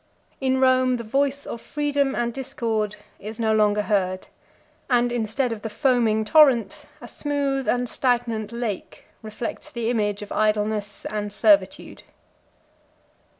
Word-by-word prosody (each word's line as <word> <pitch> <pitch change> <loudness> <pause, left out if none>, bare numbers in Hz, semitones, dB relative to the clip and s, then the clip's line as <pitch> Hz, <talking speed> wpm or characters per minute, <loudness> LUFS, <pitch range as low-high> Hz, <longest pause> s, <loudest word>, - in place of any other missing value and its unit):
In 265 -1 +1
Rome 255 -1 +3
the 235 - -6
voice 275 +4 0
of 230 - -6
freedom 285 -2 -1
and 235 0 -1
discord 225 -6 -2 0.2
is 215 +2 -8
no 220 -1 +2
longer 210 -1 +3
heard; 185 -3 -1 0.6
and, 245 -1 +3
instead 240 +2 -1
of 225 -2 -5
the 225 - -4
foaming 220 -2 +1
torrent, 250 -6 +4
a - - -10
smooth 280 -2 -2
and 245 0 +1
stagnant 235 -4 -1
lake 235 -4 -5 0.2
reflects 220 +2 -6
the 235 -1 -2
image 210 -3 -1
of 205 - -11
idleness 210 -1 -1
and 210 -1 -3
servitude. 300 +8 +2
235 Hz, 135 wpm, -23 LUFS, 215-260 Hz, 0.6 s, torrent